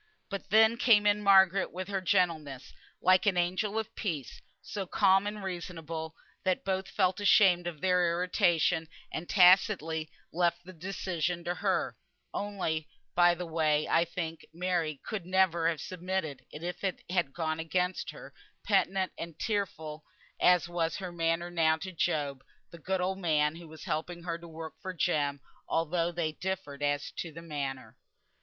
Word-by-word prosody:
But 195 -1 -5
then 220 +3 +5
came 220 -4 +5
in 205 0 +3
Margaret 195 -1 +5
with 185 +1 -5
her 195 -1 -1
gentleness, 165 -8 0 0.3
like 185 +2 +5
an 190 -3 +3
angel 185 +5 0
of 220 -1 -3
peace, 155 - -4 0.2
so 195 -3 -5
calm 195 +1 +4
and 210 -1 -5
reasonable, 165 -3 -5 0.3
that 185 -1 0
both 190 0 -1
felt 185 -1 +1
ashamed 190 -3 +5
of 160 -4 -6
their 180 -1 +3
irritation, 170 -2 +2 0.2
and 165 +2 -5
tacitly 180 -4 +4 0.2
left 175 +1 +1
the 185 - -10
decision 175 -1 -3
to 175 - -1
her - - 0 0.4
(only, 180 -6 -2 0.3
by 175 0 +5
the 180 +1 -5
way, 155 -2 +1
I 165 - +4
think 165 -1 -5
Mary 170 -4 -1
could 200 -6 -4
never 180 -3 +3
have 165 -3 -2
submitted 180 -4 -4
if 175 +4 -6
it 190 -2 -2
had 175 -6 +1
gone 160 +1 -2
against 180 +3 -1
her, - - -10 0.3
penitent 190 -1 +1
and 165 -2 -6
tearful 160 -8 -3 0.4
as 180 -2 +4
was 170 -2 -1
her 185 -2 -5
manner 170 +1 -1
now 160 -2 +3
to 185 +3 -6
Job, 145 -5 -1 0.3
the 170 - -11
good 190 +3 -1
old 190 +1 -1
man 155 -3 +2
who 170 -1 -11
was 160 0 -11
helping 170 +1 -3
her 170 -1 -3
to 170 - -11
work 160 -1 -8
for 185 -1 -5
Jem, 145 -5 0 0.3
although 165 +1 0
they 170 -2 -1
differed 180 -5 -5
as 145 0 0
to 165 - -4
the 165 +2 -10
manner). 135 -7 -5
175 Hz, 165 wpm, -30 LUFS, 160-190 Hz, 0.4 s, then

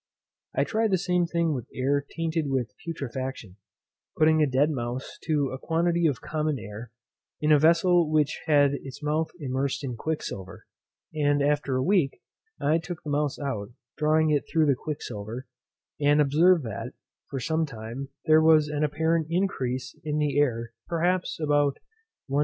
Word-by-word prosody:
I - - +3
tried 220 0 0
the 190 - +3
same 180 -1 +1
thing 170 -2 +1
with 125 -5 -5
air 140 +2 +1
tainted 165 -2 -1
with 130 -4 -1
putrefaction, 130 - -5 0.6
putting 155 0 +4
a 150 - +4
dead 140 +4 +3
mouse 125 -1 -4
to 150 -4 +1
a 130 - -5
quantity 170 +1 +1
of 140 -6 -1
common 155 -1 -1
air, 110 +1 -8 0.5
in 155 0 +2
a 150 - +7
vessel 170 +1 +4
which 155 -1 +1
had 145 -2 +4
its 135 +1 -7
mouth 155 +2 0
immersed 135 0 -2
in 125 -3 -3
quicksilver, 100 - -5 0.5
and 145 -2 +2
after 145 -2 +1
a 130 - +1
week 175 -7 +2 0.4
I 155 +3 +2
took 170 0 -7
the 150 - -4
mouse 145 -1 0
out, 120 -7 -4 0.2
drawing 155 +1 +2
it 145 -2 +1
through 160 -2 +3
the 140 - +4
quicksilver, 120 -4 -6 0.5
and 145 0 +4
observed 155 +4 +4
that, 115 +3 -5 0.4
for 135 - -3
some 160 +5 0
time, 120 +2 -7 0.2
there 155 -1 +6
was 155 -2 +5
an 150 0 -1
apparent 160 +2 +1
increase 135 -9 -1
of - - -28 0.2
the 145 -1 +1
air 115 -5 0
perhaps 175 +2 0
about 145 -2 +2 0.5
1/20. 140 +1 0
150 Hz, 165 wpm, -26 LUFS, 135-160 Hz, 0.6 s, a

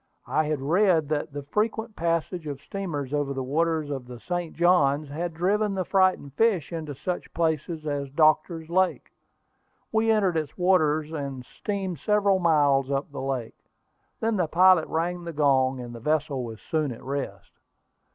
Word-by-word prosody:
I 155 - +1
had 150 -2 -1
read 165 -1 +3
that 150 0 -1
the 145 0 -6
frequent 220 +7 -2
passage 170 0 -1
of 140 -2 -5
steamers 150 -9 -4
over 145 -2 -1
the 130 - -2
waters 155 +2 0
of 135 -3 -5
the 125 -1 -9
St. 175 +3 -4
Johns 150 -4 +3
had 170 +4 -3
driven 200 +4 +1
the 185 -1 -1
frightened 185 -8 +2
fish 190 -4 +1
into 155 -3 -5
such 175 +6 -4
places 160 -1 -1
as 145 -2 -2
Doctor's 155 +2 +2
Lake. 185 +2 0 0.8
We 225 0 +2
entered 200 -6 +3
its 155 -3 -4
waters, 155 -4 +2
and 140 -5 -5
steamed 190 -3 -4
several 200 +2 +2
miles 145 -5 +3
up 140 +1 -2
the - - -6
lake. 130 -4 -5 0.5
Then 225 -1 0
the 180 -3 +1
pilot 180 0 +5
rang 175 +2 -2
the 170 -1 -6
gong, 135 -3 +2
and 120 -1 -7
the 115 - -8
vessel 145 -1 0
was 115 -2 -7
soon 155 -4 +1
at 115 - -9
rest. 140 +1 -5
155 Hz, 170 wpm, -26 LUFS, 140-180 Hz, 0.8 s, pilot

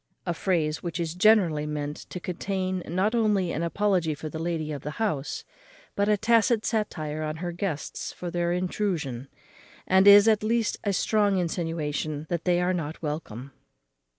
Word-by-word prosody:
_ - - -52 0.2
A 175 - 0
phrase 160 -3 0
which 170 -1 -4
is 165 -2 -2
generally 180 -6 +4
meant 150 -1 -3
to 180 - -5
contain 185 +1 -3
not 190 +7 0
only 210 -6 +2
an 155 - -2
apology 175 -2 +1
for 155 +2 -6
the 160 - -6
lady 165 -2 -2
of 145 -3 -5
the 150 +1 -6
house, 175 -11 -2 0.5
but 200 +1 +1
a 210 - +4
tacit 225 +1 +3
satire 155 -9 -2
on 155 0 -3
her 175 +2 -4
guests 170 -4 -4
for 175 -1 -6
their 175 0 0
intrusion, 175 - -2 0.6
and 190 +1 +4
is 205 +1 +9
at 220 -2 +4
least 225 0 0
a 200 - +1
strong 205 0 +2
insinuation 160 -3 -2
that 170 -2 -2
they 175 -1 +3
are 180 +1 +1
not 160 -3 -4
welcome. 140 -4 -5
175 Hz, 175 wpm, -26 LUFS, 155-200 Hz, 0.6 s, is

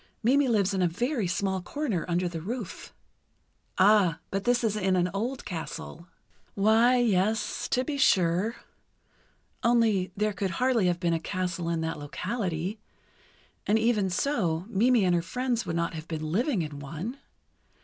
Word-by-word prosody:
Mimi 270 +4 +4
lives 205 -4 +2
in 190 - 0
a 180 - +4
very 235 - -1
small 190 +1 -1
corner 225 - -2
under 175 +1 0
the 165 -2 -5
roof." 215 +1 -6 0.9
"Ah, 190 -4 +5
but 195 +1 -2
this 245 0 +2
is 215 -2 +1
in 190 -3 +1
an 180 0 +1
old 240 +7 -3
castle." 170 -2 -6 0.5
"Why, 225 +5 +4
yes, 215 -2 +1
to 255 - +1
be 280 +1 -3
sure—only, 210 +1 -1
there 210 0 +1
could 195 -1 -2
hardly 250 -6 +2
have 175 -1 0
been 170 -2 +1
a 165 - 0
castle 180 -1 -3
in 165 -1 -1
that 160 -1 -3
locality, 185 +4 -3 0.9
and 210 - +4
even 220 -4 +2
so, 180 - 0
Mimi 230 0 +3
and 180 - +3
her 170 - +2
friends 240 +3 -2
would 165 - -2
not 170 0 -1
have 160 0 -7
been 155 -1 -4
living 230 - +1
in 150 -2 -7
one. 165 - -6
195 Hz, 160 wpm, -27 LUFS, 175-235 Hz, 0.9 s, Ah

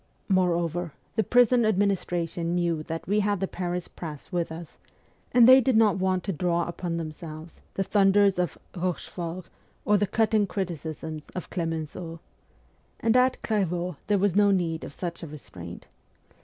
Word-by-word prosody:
Moreover, 175 -3 +1 0.2
the 220 - +2
prison 245 0 +4
administration 175 -5 0
knew 170 -3 0
that 165 +1 -6
we 205 +2 +2
had 205 -1 +1
the 195 - -1
Paris 180 -1 -3
press 155 -4 -8
with 170 -2 -1
us, 165 0 -9 0.5
and 240 -1 +7
they 260 +1 +9
did 260 -2 +3
not 210 -4 +4
want 185 -1 +1
to 195 - -2
draw 170 +1 0
upon 170 0 -3
themselves 155 0 -7
the 195 - +1
thunders 195 -1 +4
of 175 -4 -1 0.2
Eochefort 175 -1 -4 0.4
or 210 - +4
the 205 - +1
cutting 215 -1 +2
criticisms 160 -4 -5
of 180 - -6
Clemenceau. 165 0 -4 0.8
And 230 +1 +2
at 255 +1 +3
Clairvaux 180 -5 -1
there 205 -1 +3
was 195 -2 +1
no 205 0 +5
need 170 -4 0
of - - -7
such 170 +3 -5
a 165 - -6
restraint. 90 - -10
180 Hz, 155 wpm, -27 LUFS, 165-205 Hz, 0.8 s, they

